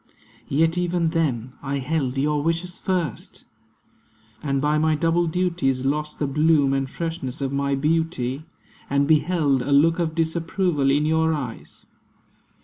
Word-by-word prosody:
Yet 165 Hz, +4 st, +2 dB
even 175 Hz, -1 st, 0 dB
then, 130 Hz, -8 st, -1 dB
I 140 Hz, 0 st, -2 dB
held 135 Hz, -1 st, -2 dB
your 145 Hz, +1 st, +1 dB
wishes 165 Hz, +3 st, -2 dB
first; 175 Hz, -, -3 dB, 1.0 s
And 140 Hz, -2 st, -1 dB
by 150 Hz, +2 st, +1 dB
my 155 Hz, 0 st, +2 dB
double 170 Hz, +2 st, +1 dB
duties 160 Hz, -7 st, 0 dB
lost 150 Hz, +2 st, -1 dB
the 150 Hz, -, -1 dB
bloom 150 Hz, -1 st, +3 dB
And 135 Hz, -1 st, -1 dB
freshness 165 Hz, -5 st, -4 dB
of 135 Hz, -1 st, -2 dB
my 140 Hz, 0 st, 0 dB
beauty; 150 Hz, -2 st, -1 dB, 0.5 s
and 140 Hz, 0 st, +2 dB
beheld 155 Hz, -3 st, +2 dB
A 135 Hz, +3 st, -3 dB
look 165 Hz, +5 st, +4 dB
of 160 Hz, -2 st, -1 dB
disapproval 165 Hz, -2 st, 0 dB
in 145 Hz, +2 st, +2 dB
your 160 Hz, +1 st, +2 dB
eyes. 125 Hz, -6 st, -7 dB
150 Hz, 145 wpm, -23 LUFS, 140-165 Hz, 1.0 s, look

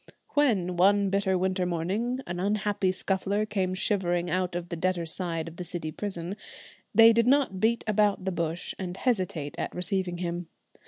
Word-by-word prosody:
When, 205 Hz, -12 st, +1 dB
one 200 Hz, +2 st, +4 dB
bitter 195 Hz, -1 st, +2 dB
winter 185 Hz, 0 st, 0 dB
morning, 200 Hz, +10 st, -1 dB
an 175 Hz, 0 st, -4 dB
unhappy 205 Hz, -1 st, +1 dB
Scuffler 195 Hz, +2 st, -1 dB
came 190 Hz, -3 st, -1 dB
shivering 175 Hz, -4 st, 0 dB
out 180 Hz, 0 st, 0 dB
of 175 Hz, 0 st, -4 dB
the 170 Hz, -, -3 dB
debtors' 170 Hz, -1 st, -1 dB
side 165 Hz, -3 st, -3 dB
of 165 Hz, 0 st, -10 dB
the 180 Hz, -, -4 dB
City 170 Hz, -3 st, -4 dB
Prison, 185 Hz, 0 st, -4 dB, 0.6 s
they 225 Hz, 0 st, +8 dB
did 230 Hz, +1 st, +3 dB
not 265 Hz, -8 st, +3 dB
beat 230 Hz, +3 st, +2 dB
about 210 Hz, -2 st, +2 dB
the 190 Hz, -, 0 dB
bush 170 Hz, 0 st, -3 dB
and 185 Hz, -1 st, -4 dB
hesitate 185 Hz, -, -1 dB
at -, -, -3 dB
receiving 180 Hz, 0 st, 0 dB
him. 175 Hz, -1 st, -3 dB
185 Hz, 170 wpm, -28 LUFS, 175-205 Hz, 0.6 s, they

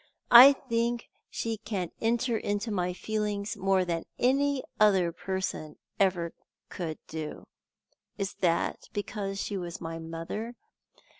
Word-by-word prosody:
I 255 Hz, +4 st, +11 dB
think 235 Hz, -3 st, -2 dB, 0.2 s
she 225 Hz, -1 st, -3 dB
can 200 Hz, -5 st, -4 dB
enter 235 Hz, +1 st, +1 dB
into 205 Hz, +1 st, -2 dB
my 180 Hz, -3 st, 0 dB
feelings 210 Hz, +2 st, -2 dB
more 195 Hz, -1 st, +2 dB
than 170 Hz, -2 st, -2 dB
any 275 Hz, +2 st, +2 dB, 0.2 s
other 190 Hz, -5 st, +4 dB
person 180 Hz, -3 st, -4 dB, 0.2 s
could -, -, +7 dB
ever 175 Hz, -3 st, 0 dB, 0.7 s
do. 155 Hz, -1 st, -6 dB, 0.7 s
Is 195 Hz, -1 st, -2 dB
that 170 Hz, -2 st, 0 dB
because 200 Hz, -2 st, -3 dB
she 200 Hz, -, -2 dB
was 175 Hz, -2 st, -5 dB
my 165 Hz, 0 st, -5 dB
mother? 165 Hz, +9 st, -5 dB
200 Hz, 125 wpm, -29 LUFS, 175-230 Hz, 0.7 s, I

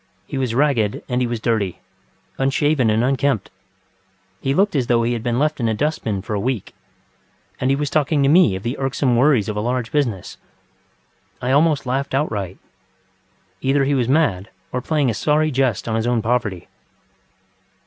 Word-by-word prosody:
He 135 Hz, -, -4 dB
was 125 Hz, -3 st, -1 dB
ragged 125 Hz, -7 st, +1 dB
and 125 Hz, 0 st, -1 dB
he 125 Hz, -, +1 dB
was 120 Hz, -1 st, -3 dB
dirty, 110 Hz, -6 st, -1 dB, 0.6 s
unshaven 135 Hz, -1 st, +2 dB
and 110 Hz, +2 st, +2 dB
unkempt; 135 Hz, -3 st, 0 dB, 0.9 s
he 135 Hz, -, 0 dB
looked 195 Hz, +5 st, +2 dB
as 130 Hz, -4 st, +1 dB
though 120 Hz, -1 st, +3 dB
he 120 Hz, +1 st, 0 dB
had 115 Hz, -, -3 dB
been 120 Hz, 0 st, -1 dB
left 150 Hz, +2 st, 0 dB
in 115 Hz, -, 0 dB
a 110 Hz, -, 0 dB
dust 150 Hz, +7 st, -1 dB
bin 100 Hz, -4 st, -2 dB
for 110 Hz, -, -5 dB
a 105 Hz, -, 0 dB
week. 120 Hz, -1 st, -3 dB, 0.9 s
And 130 Hz, -, 0 dB
he 135 Hz, -, +3 dB
was 145 Hz, 0 st, -2 dB
talking 150 Hz, -1 st, +2 dB
to -, -, +3 dB
me 150 Hz, -, +5 dB
of 95 Hz, -, -6 dB
the 120 Hz, +3 st, -3 dB
irksome 135 Hz, -1 st, 0 dB
worries 125 Hz, -4 st, +3 dB
of 105 Hz, -, -3 dB
a 105 Hz, -, -1 dB
large 120 Hz, 0 st, -2 dB
business. 120 Hz, -11 st, -2 dB, 1.0 s
I 125 Hz, -, -1 dB
almost 150 Hz, 0 st, +3 dB
laughed 135 Hz, +2 st, -1 dB
outright. 105 Hz, -, -2 dB, 1.0 s
Either 135 Hz, +1 st, +2 dB
he 140 Hz, +1 st, +1 dB
was 125 Hz, -3 st, +1 dB
mad 130 Hz, -, +1 dB, 0.2 s
or 125 Hz, -, -2 dB
playing 145 Hz, -3 st, +1 dB
a -, -, -3 dB
sorry 150 Hz, +8 st, +1 dB
jest 130 Hz, -6 st, 0 dB
on 110 Hz, -, -1 dB
his 115 Hz, +1 st, 0 dB
own 120 Hz, -3 st, +1 dB
poverty. 110 Hz, -6 st, -1 dB
125 Hz, 190 wpm, -20 LUFS, 115-140 Hz, 1.0 s, me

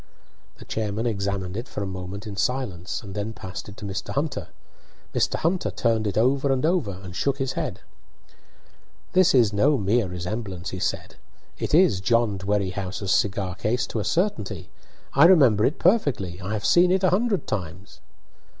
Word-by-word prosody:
The -, -, -12 dB
chairman 110 Hz, +1 st, -2 dB
examined 100 Hz, -4 st, -2 dB
it 115 Hz, +4 st, -4 dB
for 105 Hz, -, -4 dB
a -, -, -3 dB
moment 95 Hz, +2 st, -6 dB
in 105 Hz, -2 st, -6 dB
silence, 100 Hz, -4 st, -2 dB
and 100 Hz, -2 st, -8 dB
then 105 Hz, +2 st, -3 dB
passed 95 Hz, -1 st, -8 dB
it 100 Hz, -, -12 dB
to 105 Hz, -, -8 dB
Mr. 95 Hz, -1 st, -4 dB
Hunter. 145 Hz, +2 st, -2 dB, 0.7 s
Mr. -, -, +1 dB
Hunter 175 Hz, +3 st, 0 dB
turned 115 Hz, -2 st, 0 dB
it 100 Hz, -, -2 dB
over 135 Hz, +4 st, +2 dB
and 130 Hz, +2 st, +1 dB
over, 160 Hz, -, +1 dB
and 90 Hz, -1 st, -9 dB
shook 140 Hz, +5 st, 0 dB
his 135 Hz, -2 st, -1 dB
head. -, -, -4 dB, 1.3 s
"This 185 Hz, -5 st, +5 dB
is 115 Hz, -5 st, +4 dB
no 140 Hz, +8 st, +3 dB
mere 105 Hz, 0 st, +1 dB
resemblance," 90 Hz, +1 st, -5 dB
he 95 Hz, -, -5 dB
said. -, -, -3 dB, 0.4 s
"It -, -, 0 dB
is 160 Hz, -, +4 dB
John 110 Hz, -1 st, +2 dB
Dwerrihouse's 95 Hz, 0 st, -2 dB
cigar 95 Hz, -2 st, +1 dB
case 110 Hz, +3 st, -1 dB
to 110 Hz, -, -4 dB
a -, -, -1 dB
certainty. 165 Hz, -, -1 dB, 0.4 s
I 140 Hz, +4 st, +7 dB
remember 135 Hz, -, +6 dB
it 145 Hz, -, 0 dB
perfectly; 125 Hz, -, +1 dB
I 100 Hz, +4 st, -4 dB
have 105 Hz, -, -3 dB
seen 175 Hz, +1 st, +5 dB
it 190 Hz, +1 st, +2 dB
a 185 Hz, -, +4 dB
hundred 205 Hz, +1 st, +1 dB
times." 90 Hz, 0 st, -5 dB
105 Hz, 175 wpm, -24 LUFS, 95-135 Hz, 1.3 s, I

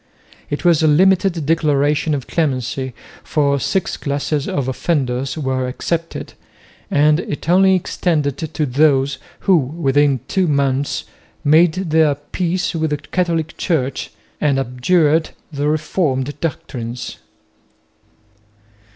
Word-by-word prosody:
It 145 Hz, -, -4 dB
was 170 Hz, -3 st, +4 dB
a 160 Hz, -, +4 dB
limited 180 Hz, +1 st, +3 dB
declaration 150 Hz, -1 st, +2 dB
of 135 Hz, -, -5 dB
clemency, 130 Hz, -4 st, -2 dB, 0.3 s
for 140 Hz, -2 st, +1 dB
six 190 Hz, +7 st, -1 dB
classes 145 Hz, 0 st, -2 dB
of 140 Hz, -3 st, -2 dB
offenders 130 Hz, -1 st, -1 dB
were 130 Hz, -3 st, -1 dB
excepted, 165 Hz, +6 st, -3 dB, 0.6 s
and 150 Hz, +2 st, +3 dB
it 150 Hz, -3 st, -5 dB
only 190 Hz, +2 st, +5 dB
extended 155 Hz, -6 st, 0 dB
to 155 Hz, -1 st, -2 dB
those 140 Hz, 0 st, +2 dB, 0.2 s
who 190 Hz, -, +4 dB
within 145 Hz, -3 st, +1 dB
two 190 Hz, -2 st, +1 dB
months 140 Hz, -1 st, 0 dB, 0.4 s
made 155 Hz, +3 st, +5 dB
their 160 Hz, -5 st, +2 dB
peace 175 Hz, +6 st, -2 dB
with 160 Hz, -1 st, -1 dB
the 150 Hz, -, -1 dB
Catholic 165 Hz, 0 st, -2 dB
Church 140 Hz, -7 st, -1 dB, 0.3 s
and 140 Hz, -3 st, +2 dB
abjured 150 Hz, +5 st, +2 dB, 0.2 s
the 145 Hz, 0 st, -2 dB
Reformed 150 Hz, -3 st, -1 dB
doctrines. 125 Hz, -6 st, -5 dB
150 Hz, 115 wpm, -19 LUFS, 135-165 Hz, 0.6 s, only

